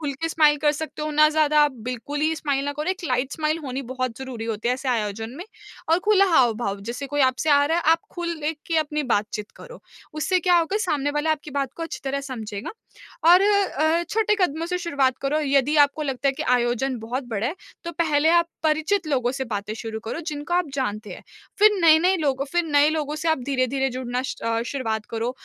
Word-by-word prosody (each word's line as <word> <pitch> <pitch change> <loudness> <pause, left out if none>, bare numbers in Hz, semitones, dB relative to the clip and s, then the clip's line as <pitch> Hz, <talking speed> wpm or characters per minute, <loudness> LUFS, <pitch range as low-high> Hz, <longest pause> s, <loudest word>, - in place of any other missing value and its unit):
खुल 290 -3 -2
के 325 +4 -3
स्माइल 305 -2 +4
कर 295 0 +2
सकते 305 0 -6
हो, 305 - -2
ना 305 +1 +5
ज़्यादा 305 -1 +3
आप 295 -2 +2 0.2
बिल्कुल 265 +4 -4
ही 315 +1 +1
स्माइल 280 -3 -1
ना 285 - -2
करो। 300 +5 -2
एक 375 -2 -5
लाइट 255 -1 -1
स्माइल, 310 0 -1
होनी 265 0 -4
बहुत 255 -3 -3
ज़रूरी 255 -4 -6
होती 225 +1 -2
है 250 - +2
ऐसे 260 +1 -5
आयोजन 225 -1 -2
में 355 - -7 0.4
और 330 +2 +4
खुला 405 -2 +5
हाव-भाव। 225 -5 +2
जैसे 240 +6 -5
कोई 290 +1 -2
आपसे 260 +4 +2
आ 285 0 +5
रहा 325 - +1
है, - - -2
आप 330 - +4
खुल 345 -1 -4
लेके 315 +2 -3
अपनी 300 0 -1
बातचीत 210 0 -3
करो। - - -12 0.3
उससे 360 +4 +1
क्या 355 0 +4
होगा, 335 +5 0
सामने 290 -8 0
वाला 295 +2 0
आपकी 300 0 -6
बात 275 -1 -2
को 335 - -5
अच्छी 330 - -5
तरह 275 +1 -1
समझेगा 220 -7 -6 0.6
और 360 +2 +8
अ, 345 -6 +2
छोटे 425 -1 +2
कदमों 330 -1 0
से 360 0 -2
शुरुआत 280 -7 0
करो। 280 +3 +1
यदि 280 +1 +2
आपको 285 +2 -4
लगता 275 -1 -1
है - - +2
कि 310 - -4
आयोजन 245 +1 -1
बहुत 245 +4 -4
बड़ा 220 0 -2
है, 305 - -2 0.3
तो 340 - -5
पहले 315 -2 +2
आप 340 0 +3
परिचित 315 +4 +1
लोगों 255 -3 +1
से 265 0 -3
बातें 210 -2 -4
शुरू 220 -1 -6
करो, 275 +9 -4
जिनको 300 +2 -3
आप 355 -2 +2
जानते 215 -6 -3
हैं। - - -10 0.4
फिर 425 0 +7
नए-नए 335 +3 +5
लोगों 275 -4 0
फिर 345 0 +2
नए 295 -2 +4
लोगों 300 -2 -2
से 325 +1 -2
आप 320 - +2
धीरे-धीरे 270 0 0
जुड़ना 250 0 -3
स्ट - - -6
अ, 230 0 0
शुरुआत 225 -6 -3
करो। 230 +2 -2
290 Hz, 220 wpm, -23 LUFS, 255-320 Hz, 0.6 s, और